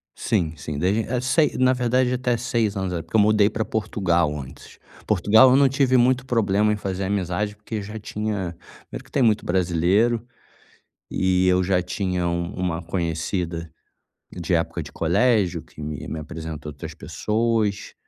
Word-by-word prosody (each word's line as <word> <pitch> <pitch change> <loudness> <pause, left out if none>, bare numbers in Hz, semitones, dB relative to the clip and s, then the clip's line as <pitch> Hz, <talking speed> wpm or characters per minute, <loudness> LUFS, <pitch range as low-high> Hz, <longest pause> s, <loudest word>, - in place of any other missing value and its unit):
Sim, 85 -8 0
sim. 70 +1 -5
Desde, 95 +7 +1
eh, 125 +2 -2
sei 150 +4 +2
na 130 0 +4
verdade, 125 +1 +1
até 125 -1 0
6 115 -3 -1
anos, 95 -2 -2
é, 85 - -2
porque 85 +7 -8
eu 105 - +6
mudei 105 0 +4
para 110 +1 -2
Portugal 85 -9 0
antes. 65 -1 -12 0.3
Portugal, 110 +5 +6
eu - - +5
não 140 -1 +5
tive 135 -1 +2
muito 125 +1 +3
problema 105 -4 +2
em - - -1
fazer 95 -1 -3
amizade, 100 +1 -1
porque 105 +1 -6
já 105 +2 -7
tinha 105 -4 -3 0.4
mesmo - - -7
que - - -22
tem 135 - +2
muito 110 -2 +2
brasileiro. 95 +7 +2 0.9
E 95 0 +2
eu 90 0 +3
já 90 -1 +1
tinha 90 -1 -2
uma 85 0 -2
conhecida 85 0 -3 0.6
de - - -3
época - - 0
de - - -10
colégio 95 +3 +2
que 75 - -14
me 75 -1 -5
me 80 - -4
apresentou 80 -1 -7
outras 70 - -8
pessoas. 110 -2 -1
100 Hz, 165 wpm, -23 LUFS, 85-115 Hz, 0.9 s, eu